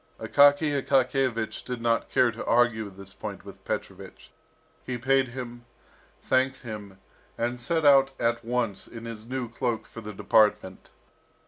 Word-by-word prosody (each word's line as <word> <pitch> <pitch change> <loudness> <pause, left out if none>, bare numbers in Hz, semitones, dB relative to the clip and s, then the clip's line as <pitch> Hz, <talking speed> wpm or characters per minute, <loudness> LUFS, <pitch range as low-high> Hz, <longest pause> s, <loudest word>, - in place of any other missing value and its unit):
Akaky 145 +1 +4
Akakiyevich 130 -4 0
did 125 -1 -5
not 115 0 0
care 125 -2 +3
to 115 - -7
argue 115 -3 +2
this 100 0 -12
point - - -7
with - - -12
Petrovich. - - -6 0.5
He 125 -1 -4
paid 135 +2 +2
him, 120 -1 -8 0.6
thanked 130 0 +1
him, 105 -4 -8 0.4
and 120 +1 -2
set 160 +6 0
out 135 -1 +6
at 120 0 0
once 115 -5 -2
in 115 -1 -10
his 115 -1 -8
new 130 -1 -3
cloak 115 0 -2
for 115 - -10
the 105 -1 -7
department. 105 -2 +1
120 Hz, 145 wpm, -27 LUFS, 110-130 Hz, 0.6 s, out